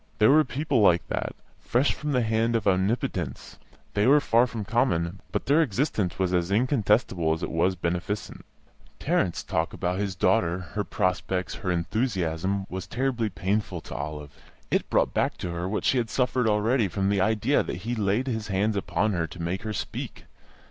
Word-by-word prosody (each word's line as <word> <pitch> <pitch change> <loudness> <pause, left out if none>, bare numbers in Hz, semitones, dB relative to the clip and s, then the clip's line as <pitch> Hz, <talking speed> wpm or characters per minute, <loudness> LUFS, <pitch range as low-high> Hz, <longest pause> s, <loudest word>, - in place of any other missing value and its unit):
There 110 +3 +5
were 155 +2 +6
people 140 -1 0
like 90 -4 +4
that, - - -3 0.2
fresh 125 +4 +1
from 150 -1 -4
the 125 -3 +2
hand 115 +1 +1
of 115 - 0
Omnipotence; 95 - -1 0.3
they 105 +3 +2
were 145 +3 +7
far 120 -3 +3
from 115 -4 -5
common, 95 -7 0
but - - -2
their 145 +4 +4
existence 110 - 0
was 95 -1 0
as 90 0 +1
incontestable 105 - +2
as 80 - -5
it - - -3
was 90 +3 +2
beneficent. 90 +4 -3 0.6
Tarrant's 85 - 0
talk 85 -2 -1
about 90 +2 -2
his 100 -2 -2
daughter, 90 -1 +2 0.2
her 105 - -1
prospects, 90 -2 -1
her 95 - -2
enthusiasm, 95 -1 -1
was 95 -1 -6
terribly 125 -3 -1
painful 95 -1 -2
to - - -9
Olive; 75 +1 -5 0.4
it - - +1
brought - - +2
back - - 0
to 90 - -4
her 85 +2 -3
what 105 - -2
she 130 - +3
had 115 -2 -2
suffered 125 -1 +1
already 110 +2 +2
from 95 +2 -1
the 100 -2 +2
idea 110 +6 +2
that 90 - -5
he 120 - -1
laid 105 +2 +1
his 110 -5 -3
hands 100 +2 0
upon 100 +1 0
her 85 -2 -1
to 90 - -11
make 85 +3 -2
her 110 -1 -4
speak. - - -5
100 Hz, 185 wpm, -26 LUFS, 90-115 Hz, 0.6 s, were